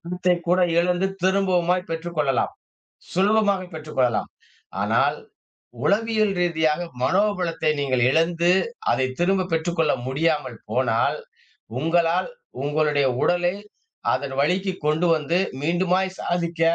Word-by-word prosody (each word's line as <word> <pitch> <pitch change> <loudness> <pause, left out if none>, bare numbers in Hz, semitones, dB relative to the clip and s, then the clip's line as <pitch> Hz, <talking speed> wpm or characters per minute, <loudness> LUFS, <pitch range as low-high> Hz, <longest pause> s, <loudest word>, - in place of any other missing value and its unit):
திண்ணத்தை 180 +1 0
கூட 180 +1 +3 0.2
இழந்து 180 +2 +2 0.2
திரும்பவுமாய்ப் 185 -2 +1
பெற்றுக் 165 +1 -5
கொள்ளலாம். 140 -4 +1 0.6
சுலபமாக 200 -1 +2
பெற்றுக் 155 -2 -9
கொள்ளலாம். 125 -3 +1 0.5
ஆனால். - - +2 0.7
உளவியல் 215 0 +2
ரீதியாக 160 -2 +1 0.2
மனோபலத்தை 180 -2 +1
நீங்க 140 -2 0 0.2
இழந்து, 165 +3 +2 0.4
அதை 130 - +2
திரும்ப 185 +1 +1
பெற்றுக்கொள்ள 165 -1 +1
முடியாமல் 145 -3 -1
போனால். 115 -3 +1 0.6
உங்களால் 165 +3 +1 0.3
உங்களுடைய 145 -1 +1 0.2
உடலே 175 +1 +2 0.6
அதன் 135 0 -2
வழிக்கு 185 +6 +1
கொண்டு 155 +3 +2
வந்து, 160 +3 0 0.2
மீண்டுமாய் 180 +3 +1
சாதிக்க 170 -1 -2
170 Hz, 105 wpm, -23 LUFS, 150-185 Hz, 0.7 s, கூட